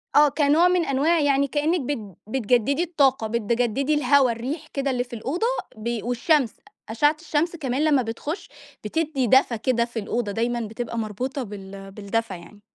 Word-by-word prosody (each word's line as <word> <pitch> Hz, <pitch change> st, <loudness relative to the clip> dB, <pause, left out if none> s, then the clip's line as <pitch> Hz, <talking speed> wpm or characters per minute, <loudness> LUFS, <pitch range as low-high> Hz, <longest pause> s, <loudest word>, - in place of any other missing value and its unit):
آه، 295 Hz, 0 st, +7 dB
كنوع 295 Hz, +4 st, +3 dB
من 360 Hz, -2 st, +2 dB
أنواع 300 Hz, +5 st, +2 dB
يعني 280 Hz, -1 st, +2 dB
كأنِك 300 Hz, +4 st, 0 dB
بت 225 Hz, -, -5 dB
بتجددي 250 Hz, +5 st, +1 dB
الطاقة، 275 Hz, -9 st, +2 dB
بتجددي 235 Hz, +5 st, 0 dB
الهوا 280 Hz, -3 st, +4 dB
الريح 275 Hz, +8 st, -5 dB
كده 275 Hz, -1 st, -2 dB
اللي 245 Hz, -1 st, 0 dB
في 245 Hz, -, -15 dB
الأوضة 310 Hz, -, -1 dB, 0.3 s
بي 230 Hz, 0 st, -3 dB
والشمس، 245 Hz, +1 st, +1 dB, 0.4 s
أشعة 295 Hz, +7 st, +2 dB
الشمس 330 Hz, +1 st, -1 dB
كمان 275 Hz, -3 st, -1 dB
لمّا 295 Hz, -4 st, +4 dB
بتخش 290 Hz, -, -5 dB, 0.4 s
بتدّي 285 Hz, +1 st, -1 dB
دفى 255 Hz, -1 st, +4 dB
كده 235 Hz, 0 st, +1 dB
في 235 Hz, -1 st, -5 dB
الأوضة 215 Hz, 0 st, -2 dB
دايمًا 235 Hz, +3 st, -1 dB
بتبقى 235 Hz, +1 st, -5 dB
مربوطة 245 Hz, +5 st, -3 dB
بال 195 Hz, -2 st, -9 dB
بالدفى 210 Hz, +1 st, -3 dB
يعني. 185 Hz, +4 st, -12 dB
255 Hz, 160 wpm, -24 LUFS, 225-295 Hz, 0.4 s, آه